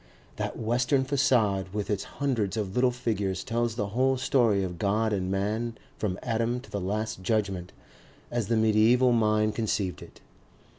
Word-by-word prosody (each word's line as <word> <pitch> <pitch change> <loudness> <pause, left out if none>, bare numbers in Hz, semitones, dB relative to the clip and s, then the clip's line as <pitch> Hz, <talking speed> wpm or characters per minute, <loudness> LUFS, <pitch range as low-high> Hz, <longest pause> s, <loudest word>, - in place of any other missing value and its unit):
That - - -3
western 120 +4 +1
facade 110 -8 +1
with 105 -2 -2
its 100 -2 -1
hundreds 115 -8 0
of 100 -3 -2
little 125 +2 +3
figures 105 -6 -2
tells 115 0 -1
the 105 -2 -2
whole 130 +5 +2
story 115 -6 +2
of 90 -2 -5
God 105 +2 +1
and 95 -2 -1
Man 110 +4 -1 0.2
from 95 -4 -2
Adam 115 +2 0
to 135 - -16
the 100 - -3
Last 105 +1 -2
Judgment, 95 -3 -1 0.6
as 120 -4 -1
the 115 - +1
mediaeval 110 +3 +4
mind 110 -2 +2
conceived 100 -7 -1
it. - - -13
110 Hz, 160 wpm, -27 LUFS, 100-120 Hz, 0.6 s, mediaeval